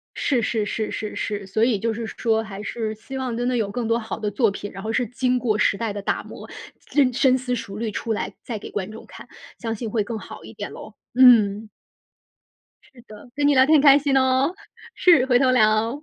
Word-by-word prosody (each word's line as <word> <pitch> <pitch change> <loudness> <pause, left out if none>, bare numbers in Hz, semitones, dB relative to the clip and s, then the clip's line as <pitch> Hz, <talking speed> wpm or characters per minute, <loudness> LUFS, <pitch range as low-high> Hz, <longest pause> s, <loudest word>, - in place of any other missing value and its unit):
是 255 -5 0
是 220 -2 -1
是 215 0 -3
是 215 - -5
是， 205 -2 -4
所 215 +3 +1
以 235 -4 +1
就 225 +2 -1
是 230 0 -5
说 225 -1 -1
还 205 -1 -8
是 220 0 -4
希 265 +5 -9
望 255 -3 -3
真 245 +1 -1
的 250 - 0
有 210 -3 -1
更 240 0 -3
多 230 +1 +2
好 225 -1 -6
的 210 -2 -2
作 220 +2 +2
品， 200 +1 -7
然 195 +1 -9
后 220 - -3
是 245 0 0
经 250 +2 0
过 225 -3 0
时 200 - +2
代 230 -2 -2
的 200 0 -6
打 - - -1
磨， - - -11 0.3
真 270 -4 +1
深 260 +1 +3
思 250 -1 -3
熟 215 -4 -7
虑 225 0 -2
出 225 +2 -3
来 - - -4
再 225 -4 -5
给 - - -10
观 195 -1 -4
众 220 +1 -11
看， - - -12 0.3
相 225 -2 -3
信 225 0 -5
会 215 -1 0
更 220 +1 -5
好 - - -11
一 - - -11
点 - - -7
咯， - - -11 0.2
嗯。 225 -4 +5 1.1
是 260 -4 -19
的， 215 +3 -13
跟 290 0 +1
你 290 - +4
聊 260 -1 +6
天 310 +3 +5
很 290 - +5
开 280 -1 +8
心 280 -1 0
哦！ 260 +3 +2 0.4
是， 330 -8 +5
回 250 -2 +4
头 260 0 +3
聊。 225 +3 +2
230 Hz, 255 characters per minute, -23 LUFS, 215-255 Hz, 1.1 s, 开